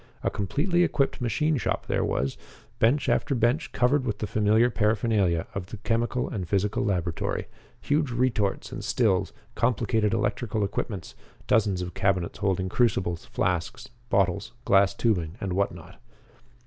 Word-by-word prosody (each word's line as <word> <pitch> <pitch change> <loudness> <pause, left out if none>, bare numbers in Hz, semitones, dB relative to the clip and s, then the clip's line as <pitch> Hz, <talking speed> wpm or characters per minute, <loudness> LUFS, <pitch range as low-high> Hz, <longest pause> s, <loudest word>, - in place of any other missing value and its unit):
A - - +1
completely 150 - 0
equipped 140 -6 +1
machine 150 +6 +1
shop - - -2
there - - 0
was; 65 +1 -1 0.4
bench 130 +6 +3
after 145 -2 +1
bench 120 +6 +1
covered 130 +3 +2
with 110 -5 -2
the 105 - -3
familiar 110 +4 +3
paraphernalia 105 -6 +1
of 95 -2 -4
the 110 - -8
chemical 120 +3 -1
and 95 -5 -5
physical 100 +1 +1
laboratory; 90 -4 -1 0.4
huge 145 -1 +1
retorts 120 -5 0
and - - -6
stills; 105 -7 +1 0.2
complicated 110 -3 +1
electrical 110 0 -1
equipments; 100 -2 -4 0.3
dozens 100 -4 +2
of 90 -1 -6
cabinets 95 -3 0
holding 95 -2 0
crucibles, 95 -6 0
flasks, 90 +8 -2 0.2
bottles, 95 -3 +1
glass 100 -1 +4
tubing, 90 -8 0
and 95 -2 -3
what 100 +2 +1
not. 85 +3 -13
105 Hz, 145 wpm, -26 LUFS, 95-120 Hz, 0.4 s, glass